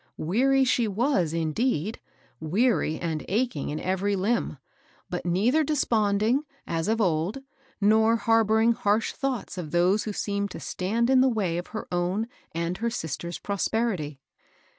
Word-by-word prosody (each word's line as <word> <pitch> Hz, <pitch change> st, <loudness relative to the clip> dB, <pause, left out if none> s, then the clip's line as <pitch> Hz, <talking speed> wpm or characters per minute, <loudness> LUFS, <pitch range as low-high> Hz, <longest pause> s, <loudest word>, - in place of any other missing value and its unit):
Weary 265 Hz, +11 st, +2 dB
she 245 Hz, -3 st, +2 dB
was, 205 Hz, -, +1 dB
indeed, 165 Hz, -, -1 dB, 0.2 s
— -, -, -35 dB
weary, 175 Hz, 0 st, +1 dB
and 160 Hz, -3 st, -2 dB
achiqg 220 Hz, -, -1 dB
in 150 Hz, +1 st, -3 dB
every 190 Hz, +2 st, 0 dB
limb; 200 Hz, -4 st, 0 dB, 0.5 s
but 180 Hz, 0 st, -3 dB
neither 225 Hz, -, +3 dB
de 305 Hz, +1 st, 0 dB
sponding, 215 Hz, -1 st, +2 dB, 0.3 s
as 165 Hz, -1 st, -2 dB
of 220 Hz, +1 st, +1 dB
old, 185 Hz, +6 st, 0 dB, 0.4 s
nor 220 Hz, +2 st, +4 dB
harboring 225 Hz, 0 st, +3 dB
harsh 215 Hz, -1 st, +1 dB
thoughts 260 Hz, -8 st, -3 dB
of 160 Hz, -4 st, -5 dB
those 180 Hz, +6 st, +2 dB
who 215 Hz, -, -2 dB
seemed 200 Hz, 0 st, -2 dB
to -, -, -8 dB
stand 230 Hz, +7 st, -1 dB
in 260 Hz, -1 st, +6 dB
the 265 Hz, -, +4 dB
way 190 Hz, -8 st, -1 dB
of 175 Hz, -, -7 dB
her 215 Hz, -, -6 dB
own 180 Hz, +5 st, 0 dB, 0.2 s
and 170 Hz, +2 st, -2 dB
her 235 Hz, +1 st, 0 dB
sister's 170 Hz, -, -4 dB
prosperity. 200 Hz, -, -2 dB
205 Hz, 155 wpm, -26 LUFS, 175-230 Hz, 0.5 s, in